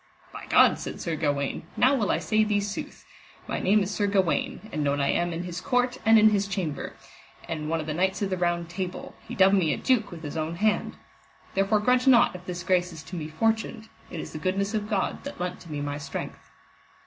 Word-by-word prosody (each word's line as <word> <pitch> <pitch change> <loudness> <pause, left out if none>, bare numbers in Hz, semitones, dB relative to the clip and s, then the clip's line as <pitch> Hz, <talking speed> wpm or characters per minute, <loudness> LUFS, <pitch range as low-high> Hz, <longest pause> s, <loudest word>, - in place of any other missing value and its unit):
By - - -9
God, - - +5
said - - -6
Sir 165 -2 -2
Gawaine, 145 0 -1
now 255 +3 +5
I - - +4 0.2
will - - -1
say 215 0 +2
thee 210 -1 +1
sooth, 205 0 -5 0.4
my - - -2
name 205 +2 +3
is 195 - -4
Sir 205 -1 0
Gawaine, 190 0 0
and 150 - -2
known 140 0 +1
I 140 - +2
am 175 0 0
in 170 +1 -4
his 180 0 -5
court 250 0 0
and 225 0 +6
in 215 0 +6
his 200 -1 +1
chamber, 180 -7 -3 0.5
and 155 -2 -4
one 165 0 0
of 155 - -4
the 155 - -3
knights 190 +4 0
of 195 - -2
the 185 - 0
Round 175 -1 0
Table, 180 +1 -5
he - - -6
dubbed 190 +1 +5
me 180 -6 +3
a - - -7
duke 250 -5 +1
with 165 -2 -10
his 145 +1 -5
own 160 +1 -2
hand. 210 +4 0 0.6
Therefore 195 +2 +2
grudge 250 +3 +2
not 245 -2 +6
if 180 0 -10
this 180 0 -4
grace 180 -1 +1
is 160 -2 -9
to 185 - -9
me 155 -3 -4
fortuned, 220 +6 -1 0.2
it 170 - -6
is - - -7
the 155 - -5
goodness 195 +5 -1
of 210 -1 -2
God 195 -3 -1
that 285 - -7
lent 180 0 -3
to 170 - -12
me 145 -1 -3
my 145 0 -3
strength. 145 -1 -7
185 Hz, 235 wpm, -26 LUFS, 165-210 Hz, 0.6 s, and